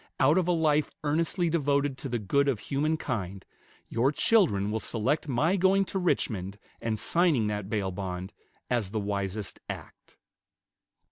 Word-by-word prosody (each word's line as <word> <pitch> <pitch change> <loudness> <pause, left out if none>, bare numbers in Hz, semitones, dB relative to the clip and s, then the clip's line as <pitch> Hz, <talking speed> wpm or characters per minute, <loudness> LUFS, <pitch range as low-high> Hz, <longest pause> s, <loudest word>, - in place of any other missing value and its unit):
Out 145 +6 +5
of 180 - -1
a - - +3
life 155 -3 +2
earnestly 165 +4 +1
devoted 145 -3 +1
to 135 - -5
the 120 - 0
good 140 +7 +1
of 135 -5 +2
human 150 +7 -1
kind, 100 - -4 0.4
your 120 +4 +2
children 145 - +3
will 110 - -1
select 125 +9 -1
my 150 +8 +2
going 195 +1 +4
to 190 - -2
Richmond 100 - -1 0.2
and 110 -1 -1
signing 165 -5 +2
that 105 -2 -3
bail 100 -4 -1
bond 90 -1 -5 0.3
as 120 -6 0
the 110 +2 -2
wisest 100 0 -3
act." - - -9
130 Hz, 155 wpm, -28 LUFS, 105-160 Hz, 0.4 s, Out